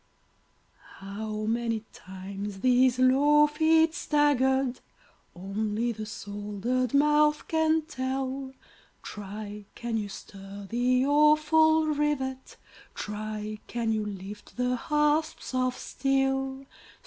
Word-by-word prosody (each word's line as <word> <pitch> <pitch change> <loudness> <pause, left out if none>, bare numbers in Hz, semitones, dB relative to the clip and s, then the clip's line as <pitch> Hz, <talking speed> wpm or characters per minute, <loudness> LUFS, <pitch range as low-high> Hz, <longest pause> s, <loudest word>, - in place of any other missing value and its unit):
How 215 +2 -5
many 230 0 -1
times 195 +1 -7
these 255 0 +4
low 285 +4 +5
feet 320 +2 +3
staggered, 265 -5 +2 0.6
Only 210 +5 -2
the 215 -1 -6
soldered 210 +4 -3
mouth 300 +1 +3
can 320 0 +2
tell; 265 -2 -3 0.5
Try! 205 0 -7
can 235 -1 -3
you 205 -2 -3
stir 195 0 -10
the 250 +3 +2
awful 305 +2 +4
rivet? 290 -3 -2 0.4
Try! 215 0 -5
can 235 -2 -1
you 215 -1 -1
lift 205 +1 -8
the 250 0 +1
hasps 300 +2 0
of 255 0 0
steel? 270 0 -1
255 Hz, 100 wpm, -28 LUFS, 210-295 Hz, 0.6 s, low